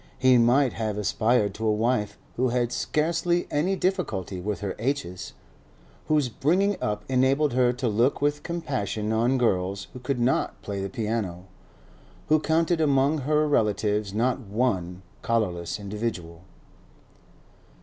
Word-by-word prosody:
He 130 -1 +5
might 125 +2 +4
have 110 -2 -3
aspired 105 0 +1
to 110 +2 -3
a - - +4
wife 110 0 0 0.2
who 130 +1 +1
had 120 0 0
scarcely 170 +5 0
any 175 +7 +1
difficulty 110 - -2
with 105 +2 -3
her 100 -2 -3
h's; 125 -7 -3 0.7
whose 150 -3 +2
bringing 180 - +1
up 105 0 -2
enabled 135 +2 +2
her 125 -1 +3
to 125 0 -2
look 115 +5 +2
with 145 +1 0
compassion 125 - -3
on 120 +4 +2
girls 95 -4 0
who 125 - -8
could 125 0 -2
not 120 +2 0
play 100 -1 -4
the 100 - -3
piano; 105 -5 -3 0.8
who 155 0 +5
counted 160 +2 +1
among 140 +1 +3
her 150 +2 +1
relatives 105 -5 +1
not 120 +6 0
one 95 -6 -2 0.2
collarless 105 -6 -1
individual. 100 -5 -5
120 Hz, 140 wpm, -26 LUFS, 105-145 Hz, 0.8 s, He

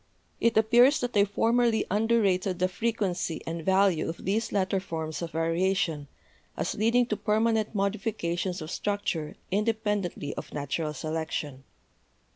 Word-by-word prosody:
It 230 -2 +2
appears 240 +6 +5
that 245 -2 -3
I 200 -1 +5
formerly 230 +2 +2
under 225 +3 +3
rated 185 -1 +1
the 185 +1 +2
frequency 185 -4 -2
and 165 0 -4
value 190 -3 +3
of 165 - -7
these 215 +5 0
latter 195 -1 +1
forms 160 -5 -5
of 170 - -3
variation, 165 -1 0 0.5
as - - -1
leading 230 +3 +3
to 220 - -2
permanent 220 +1 +1
modifications 195 -3 -1
of 155 - -8
struc 205 0 -2
ture 155 -3 -2 0.2
independently 210 -7 -1
of - - -8
natural 150 +2 -2
selection. 155 -3 -4
195 Hz, 140 wpm, -28 LUFS, 165-220 Hz, 0.5 s, appears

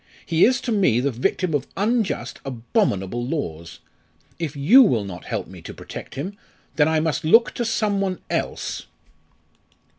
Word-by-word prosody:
He 165 0 +4
is 255 +2 +2
to 240 - -3
me 185 - +3
the 140 +3 0
victim 150 +8 -1
of 145 - -1
unjust, 220 +1 -1
abominable 120 - -1
laws! 85 - -4 0.6
If 160 -3 -3
you 175 - +7
will 125 - +3
not 90 -2 -8
help 110 -6 -3
me 90 -2 -12
to - - -9
protect - - -9
him 185 +9 -4 0.4
then 150 -1 +4
I 160 0 +2
must 155 -1 -1
look 225 +10 +5
to 240 - -2
some 215 -3 0
one 185 -3 -1
else." - - -3
155 Hz, 160 wpm, -23 LUFS, 120-200 Hz, 0.6 s, you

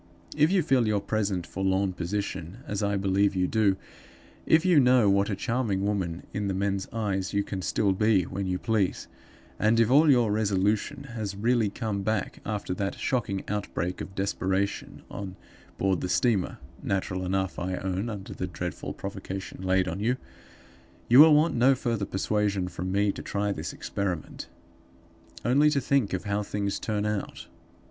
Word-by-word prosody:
If 150 +3 +4
you 190 -3 +3
feel 130 -6 +2
your 105 -1 +2
present 100 -4 -1
forlorn 95 +1 0
position, 90 +3 -4
as 105 -7 -3
I 100 -1 +1
believe 100 +1 +2
you 90 -1 +2
do; 100 -1 +2 0.7
if 160 +2 +4
you 175 -5 +6
know 125 -4 +5
what 100 +1 +2
a 100 - -1
charming 110 -4 -1
woman 95 -5 -2
(in 100 0 -2
the 95 - -1
men's 100 0 -1
eyes) 100 -4 -2
you 100 0 +2
can 95 -2 -5
still 100 +2 +1
be 105 -1 +3
when 95 +3 -4
you 90 0 0
please; 105 -3 0 0.5
and 110 +2 +3
if 115 +1 +3
all 150 +3 +6
your 120 -6 +4
resolution 105 +5 0
has 105 -4 -4
really 115 +1 +2
come 105 -2 -3
back, 110 +1 -2
after 105 -3 -2
that 100 +2 -2
shocking 100 -7 -1
outbreak 95 -3 -3
of 95 - -8
desperation 95 0 -2
on 95 -2 -6 0.4
board 95 -3 +1
the 90 - -3
steamer 100 0 +1 0.2
(natural 95 -1 -2
enough, 95 0 -1
I 90 +1 -2
own, 95 +4 -2
under 100 -3 -6
the 90 - -4
dreadful 90 0 -5
provocation 95 -1 -6
laid 95 0 +2
on 90 +1 -3
you), 120 +5 +1 0.9
you 125 +3 +8
will 155 0 +9
want 155 +3 +3
no 130 +3 +4
further 115 -5 -1
persuasion 100 -1 0
from 90 +1 -4
me 100 +1 +2
to - - -8
try 100 0 -1
this - - -4
experiment. 95 -5 -4 1.0
Only 140 +5 +5
to 145 -2 +1
think 130 -5 +1
of 90 - -2
how 100 0 -1
things 100 -1 -2
turn 105 -1 -2
out! 105 -1 -3
100 Hz, 170 wpm, -27 LUFS, 95-110 Hz, 1.0 s, will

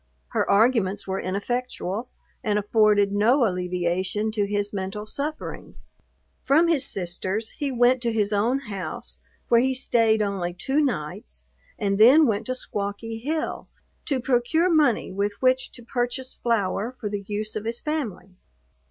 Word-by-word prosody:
Her - - 0
arguments 205 -3 +3
were 190 0 -2
ineffectual, 220 +2 -3 0.3
and 210 -1 +1
afforded 210 -1 +3
no 235 +6 +4
alleviation 180 +2 -1
to 210 -2 0
his 205 0 -1
mental 200 +2 -4
sufferings. 295 +7 -5 0.6
From 315 +5 +4
his 300 -5 +3
sister's, 190 0 -2
he 285 -2 -3
went 245 0 +3
to 235 -1 0
his 210 -2 0
own 225 +6 +2
house, 200 -7 -5 0.3
where 235 0 +6
he 260 +1 +1
stayed 225 -4 +2
only 185 -4 -2
two 270 +11 0
nights, 150 - -4 0.3
and 200 -1 0
then 270 +8 +8
went 220 -3 0
to 255 - -1
Squawky 210 0 -4
Hill 310 +5 -3 0.4
to 275 -4 +1
procure 270 +8 +2
money, 295 -7 +3
with 200 +2 -1
which 255 0 +2
to 240 - -12
purchase 245 +2 -3
flour 230 +1 -1
for 215 - -3
the 205 -1 -3
use 215 +1 -3
of 215 0 -4
his 230 +1 -2
family. 225 - -4
220 Hz, 150 wpm, -25 LUFS, 200-255 Hz, 0.6 s, then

